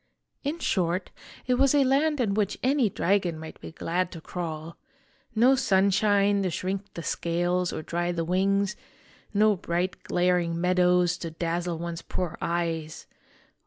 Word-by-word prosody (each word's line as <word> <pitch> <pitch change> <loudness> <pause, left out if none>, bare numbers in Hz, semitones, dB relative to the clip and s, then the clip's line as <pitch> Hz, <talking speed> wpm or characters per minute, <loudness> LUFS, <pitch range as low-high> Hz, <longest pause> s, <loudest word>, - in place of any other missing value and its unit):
In 295 +3 -2
short, 180 - -1 0.3
it 250 0 +1
was 275 +1 +4
a 285 - +5
land 285 +3 +2
in 220 -5 +1
which 210 -1 0
any 260 -3 +3
dragon 185 -3 +1
might 160 0 -10
be - - -8
glad 175 +2 -2
to 165 - -7
crawl: 165 -1 -6 0.6
no 245 +4 +6
sunshine 200 -3 +3
to 190 - 0
shrink 195 +3 -3
the 170 - -5
scales 175 +2 0
or - - -5
dry 175 +2 -1
the 165 -1 -2
wings, 195 +3 +1 0.6
no 215 0 +4
bright 175 +1 -2
glaring 175 -2 +1
meadows 180 0 +3
to 170 - -4
dazzle 170 +1 -2
one's 170 0 -5
poor 180 -4 -3
eyes. 165 -2 -2
180 Hz, 150 wpm, -27 LUFS, 170-205 Hz, 0.6 s, no